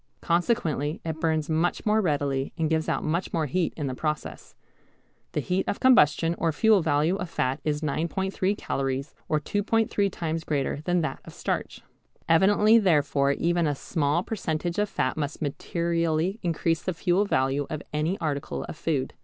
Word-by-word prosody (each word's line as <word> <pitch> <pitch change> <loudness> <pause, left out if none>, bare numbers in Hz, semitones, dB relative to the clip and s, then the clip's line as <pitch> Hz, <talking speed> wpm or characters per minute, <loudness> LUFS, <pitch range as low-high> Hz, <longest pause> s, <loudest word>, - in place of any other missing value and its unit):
Consequently 170 - 0
it 160 -1 -3
burns 160 -2 0
much 165 +2 0
more 215 0 +3
readily 140 -6 0
and 160 -1 0
gives 160 -1 +1
out - - 0
much 170 +4 -1
more 160 -2 0
heat 170 +5 0
in 150 - -2
the 130 - -2
process. 150 +3 -4 0.8
The 150 - 0
heat 180 +7 -1
of - - -2
combustion 165 - +5
or 165 0 +2
fuel 215 +5 +4
value 155 +3 +2
of 180 -4 -5
fat 130 0 -1
is 150 -1 -1
9·3 190 +6 -1
calories 135 +1 -2 0.2
or 155 - +2
2·3 205 +3 0
times 165 -1 -3
greater 145 -1 -1
than 175 -1 +2
that 160 - -3
of - - -12
starch. - - -3 0.5
Evidently 205 +6 +5
therefore 145 -7 +2
even 170 +2 +1
a 145 - 0
small 150 +3 0
percentage 175 -4 -2
of 210 0 +1
fat 130 - -1
must 150 -1 -3
materially 170 +4 -1
increase 165 -1 0
the 185 - -3
fuel 180 +4 +2
value 135 -4 0
of 155 - -4
any 155 +6 0
article 145 -3 -3
of - - -7
food. 140 -5 -1
160 Hz, 170 wpm, -26 LUFS, 150-180 Hz, 0.8 s, combustion